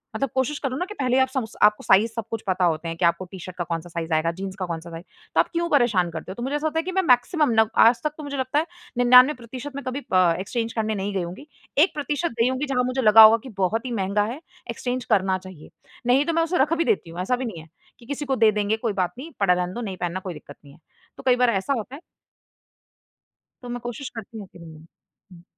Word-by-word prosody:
मतलब 275 +3 -1
कोशिश 265 +3 0
करो 260 -1 -1
ना 360 - -2
कि 420 - -9
पहले 255 -1 +1
आप 260 - +4
सम्स 260 -4 -4
आपको 210 0 +4
साइज़ 215 +4 +4
सब 230 - -2
कुछ 225 -1 -3
पता 185 -1 +1
होते 165 0 0
हैं 165 - -4
कि 175 - +1
आपको 170 +2 +1
टी-शर्ट 185 -1 -9
का 175 - -1
कौन-सा 170 0 -5
साइज़ 165 -1 -4
आएगा, 160 +2 +1
जीन्स 190 +2 -6
का 185 - -1
कौन-सा 170 0 -6
साइज़। 165 +1 -8 0.3
तो - - +3
आप - - +4
क्यों 340 0 0
परेशान 215 - +2
करते 165 +3 -7
हो? - - -5
तो 240 - -6
मुझे 275 +3 -2
ऐसा 305 +1 -1
लगता 320 +1 -1
है - - -2
कि 370 - -4
मैं 380 +1 +1
मैक्सिमम 255 +4 +3
नव 220 -1 +4 0.2
आज 235 +1 +4
तक 300 -1 -1
तो 305 - -8
मुझे 285 -1 -5
लगता 260 +3 0
है 320 - -1 0.3
99% 250 +1 +4
मैं 280 - -5
कभी 255 +2 -3
अ, 180 -2 +5
एक्सचेंज 230 +4 -3
करने 220 -1 -1
नहीं 200 +1 -3
गई 185 - 0
होऊँगी। 185 - -8 0.3
1% 300 -1 +1
गई 230 - +4
होऊँगी 260 +3 -2
जहाँ 255 -3 0
मुझे 255 +1 -1
लगा 220 0 +8
होगा 220 +1 +8
कि 260 - -9
बहुत 220 +6 0
ही 250 - -4
महँगा 200 -1 0
है, 275 - -7 0.3
एक्सचेंज 250 0 -3
करना 190 -3 +2
चाहिए। 185 -4 -13 0.4
नहीं 270 +4 +4
तो 335 - -1
मैं 330 0 +2
उसे 355 +2 -1
रख 300 +4 +2
भी 335 - +2
देती 390 - 0
हूँ, 170 +2 -8
ऐसा 250 +7 +1
भी 255 0 -4
नहीं 170 -8 -6
है 160 - -16 0.3
कि 235 - -16
किसी 285 +2 -4
को 265 -1 0
दे 220 -2 +4
देंगे 210 +1 0
कोई 210 - 0
बात 185 0 -1
नहीं, 315 +5 -8
पड़ा 190 -3 +4
रहने 180 0 -2
दो, 240 - -5
नहीं 195 -5 -5
पहनना 175 +1 -3
कोई 185 -2 -6
दिक्कत 145 -2 -12
नहीं 140 -1 -15
है। 165 - -20 0.4
तो - - -11
कई 255 -1 +4
बार 250 -1 +3
ऐसा 205 +6 0
होता 245 +5 -6
है। 300 - -11 1.6
तो 245 - -8
मैं 245 0 -4
कोशिश 240 +3 -6
करती 225 0 -8
हूँ 200 -3 -8
कि - - -14
नहीं 160 -1 -13 0.5
हुँ। 170 -1 -15
225 Hz, 265 wpm, -24 LUFS, 185-265 Hz, 1.6 s, लगा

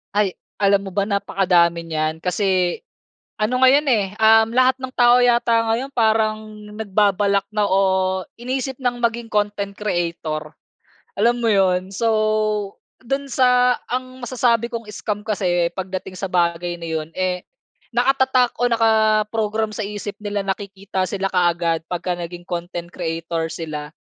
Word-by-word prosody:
Ay, 205 -3 +1 0.3
alam 200 0 +3
mo - - -6
ba, 200 - +1
napakadami 180 -4 +2
niyan 160 0 -3
kasi 185 -1 +1 0.6
ano 245 +4 0
ngayon 275 +3 +5
eh, 215 -6 +3
uhm, 220 0 +6
lahat 255 0 +4
ng 260 0 -6
tao 245 0 +6
yata 235 -2 +3
ngayon 260 +4 -3
parang 220 -2 +2 0.4
nagbabalak 200 -1 +1
na 210 -1 +2
o 190 -1 +2 0.2
iniisip 260 +1 -3
ng 245 -1 0
maging 235 0 -1
content 205 -1 -1
creator. 170 -6 -3 0.7
Alam 235 +4 +3
mo - - +1
'yon, 185 -1 +2
so 230 +3 0 0.9
do'n 275 +3 -2
sa 250 -1 +3
ang 255 +1 -4
masasabi 235 -2 +1
kong 230 -1 -5
scam 210 0 -4
kasi 175 -5 +1
pagdating 185 0 -5
sa 195 - -2
bagay 175 0 0
na 165 - -6
'yon, 160 -1 -3
eh, 185 -1 -2 0.5
nakatatak 255 0 +3
o 245 - +4
nakaprogram 220 -1 +2
sa 215 - -3
isip 205 0 -6
nila 205 -1 -2
na 195 - 0
kikita 195 -2 -4
sila 195 -1 -2
kaagad 170 -2 +1
pagka 180 0 -2
naging 175 0 -7
content 175 0 -5
creator 165 -1 -3
sila. 150 -2 -6
205 Hz, 140 wpm, -21 LUFS, 180-230 Hz, 0.9 s, uhm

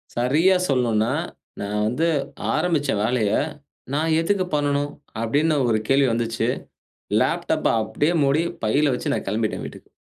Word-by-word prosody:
சரியா 150 +10 +3
சொல்லணுனா, 120 -4 +2 0.5
நான் 105 +1 -1
வந்து 140 +9 0 0.5
ஆரம்பிச்ச 155 -6 0
வேலைய, 110 -2 +1 0.6
"நான் 160 +2 +1
எதுக்கு 185 +2 +1
பண்ணனும்?" 145 0 0 0.3
அப்படின்னு 150 +7 +1
ஒரு 110 -2 +2
கேள்வி 135 0 +4
வந்துச்சு. 115 -1 -1 0.7
லேப்டாப்ப - - 0 0.2
அப்படியே 150 +9 0
மூடி 140 +4 +2 0.2
பையில 140 +5 +2
வச்சு, 125 - -2
நான் - - -3
கெளம்பிட்டேன் 110 +2 -1
வீட்டுக்கு. - - -11
135 Hz, 125 wpm, -23 LUFS, 115-150 Hz, 0.7 s, கேள்வி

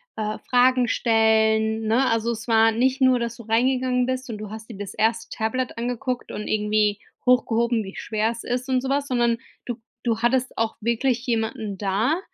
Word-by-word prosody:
äh, 215 0 -3
Fragen 250 0 +4
stellen, 220 -1 +2
ne? 245 +5 +3
Also, 230 +1 0
es 225 +1 -6
war 225 -1 +5
nicht 255 +4 +1
nur, 260 -1 +5
dass 235 -1 -3
du - - -9
reingegangen 250 +2 +1
bist 255 0 -3
und 215 - -4
du 210 -1 -8
hast 220 +1 -9
dir 225 - -9
das 200 -1 -6
erste 225 +1 0
Tablet 245 +3 -2
angeguckt 245 +1 -3
und 210 - -5
irgendwie 210 -1 +1 0.3
hochgehoben, 235 -2 +2
wie 190 -1 -9
schwer 220 0 -1
es 230 0 -6
ist 250 +2 -3
und 255 -1 +2
so 265 - -4
was, 280 +1 0
sondern 240 -2 +1 0.3
du 240 -2 -5 0.2
du 230 -2 0
hattest 250 +2 +1
auch 225 -1 0
wirklich 235 +2 0
jemanden 225 -4 -2
da, 215 - +1
230 Hz, 190 wpm, -23 LUFS, 220-250 Hz, 0.3 s, war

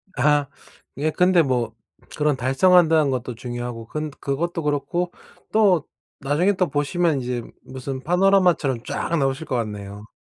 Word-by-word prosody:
아. 145 -1 +2 0.5
예 155 +3 0
근데 180 +1 +4
뭐 120 -5 -1 0.4
그런 150 -1 +2
달성한다는 155 +3 +4
것도 125 -1 -3
중요하고 120 -1 -6
근 155 +4 -4
그것도 165 +4 -2
그렇고 150 +5 -1 0.4
또 195 -8 +3 0.4
나중에 150 +8 +2
또 180 -3 0
보시면 145 +1 +1
이제 120 -1 -3 0.2
무슨 130 0 -6
파노라마처럼 180 -7 +2
쫙 170 - -2
나오실 135 +2 -1
것 130 - -2
같네요. 105 -2 -6
145 Hz, 300 characters per minute, -22 LUFS, 125-170 Hz, 0.5 s, 근데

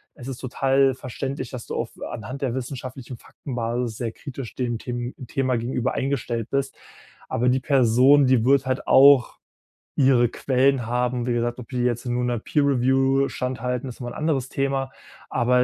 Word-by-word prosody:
es 125 -3 -10
ist 135 -3 -5
total 135 +1 +2
verständlich, 130 0 -5
dass 125 -3 -7
du - - -5
auf - - -3 0.2
anhand 130 +5 -7
der 130 -4 -1
wissenschaftlichen 130 0 -6
Faktenbasis 120 -2 -4
sehr 115 -2 -3
kritisch 135 -2 -8
dem 120 -2 -2
Them 120 +1 -5
Thema 130 -1 0
gegenüber 125 +2 -1
eingestellt 120 -4 -2
bist. 140 0 -1 0.5
Aber 120 +2 0
die 130 +1 +1
Person, 135 +1 +5
die 130 -3 +3
wird 135 0 +4
halt 130 0 -2
auch 135 -2 +6 0.6
ihre 130 -4 +4
Quellen 130 0 +1
haben. 125 0 0
Wie 120 - +1
gesagt, 120 +1 -1
ob 120 - -9
die 125 - -3
jetzt 120 0 -1
nun 125 0 -1
'ner 120 -1 0
Peer 145 +6 0
Review 135 0 +2
standhalten, 125 0 -3
ist 120 - -10
nochmal 120 0 -5
'n - - -8
anderes 150 -5 0
Thema, 135 -1 -1 0.4
aber 125 +1 +3
125 Hz, 175 wpm, -24 LUFS, 120-135 Hz, 0.6 s, auch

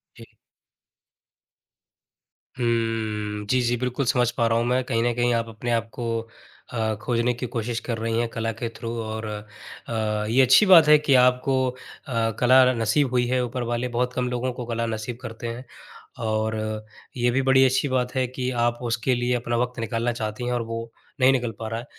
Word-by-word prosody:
जी। - - -15 2.2
हम्म, 110 -3 -1
जी, 130 -1 +3
जी, 120 0 +1
बिल्कुल 125 +2 -2
समझ 125 -2 +2
पा 115 - +2
रहा 115 0 +2
हूँ 115 - +1
मैं। 125 +1 +1
कहीं 115 -2 0
न 120 - +1
कहीं 120 0 +2
आप 115 0 0
अपने 115 +2 -4
आप 115 -1 0
को 115 -2 -3 0.5
अ, 110 -2 0
खोजने 120 +1 +1
की 120 - -5
कोशिश 115 -1 -3
कर 115 -1 -4
रही 115 0 -1
हैं 120 - +1
कला 115 0 -2
के 115 +1 -5
थ्रू 115 0 -5
और 110 0 -5
अ, 105 0 -6 0.8
ये 125 +4 +4
अच्छी 130 +10 +6
बात 170 -5 +8
है 150 - +8
कि 150 -2 +1
आपको 125 +1 +3
अ, 115 -2 -4
कला 130 +1 +6
न 120 - -5
नसीब 130 +5 +2
हुई 125 -1 +2
है, 125 0 +1
ऊपर 125 +1 -4
वाले 120 +1 -1
बहुत 125 0 0
कम 125 0 -1
लोगों 125 +1 -2
को 125 -1 -6
कला 115 0 -2
नसीब 110 +2 -6
करते 115 +1 -7
हैं। 120 +3 -6 0.6
और 110 0 0 0.6
ये 120 0 +2
भी 135 - +1
बड़ी 130 0 +6
अच्छी 130 +3 +2
बात 125 -1 -1
है 130 - +2
कि 130 0 -3 0.2
आप 120 0 -1
उसके 120 +1 0
लिए 120 +1 0
अपना 120 0 -2
वक़्त 125 0 -2
निकालना 115 +1 -1
चाहती 110 +1 -4
हैं 125 - -1
और 120 - 0
वो 115 0 -5 0.3
नहीं 130 0 +6
निकल 120 -3 0
पा 110 - -4
रहा 115 +1 -3
है। 120 - -9
120 Hz, 200 wpm, -24 LUFS, 115-125 Hz, 2.2 s, बात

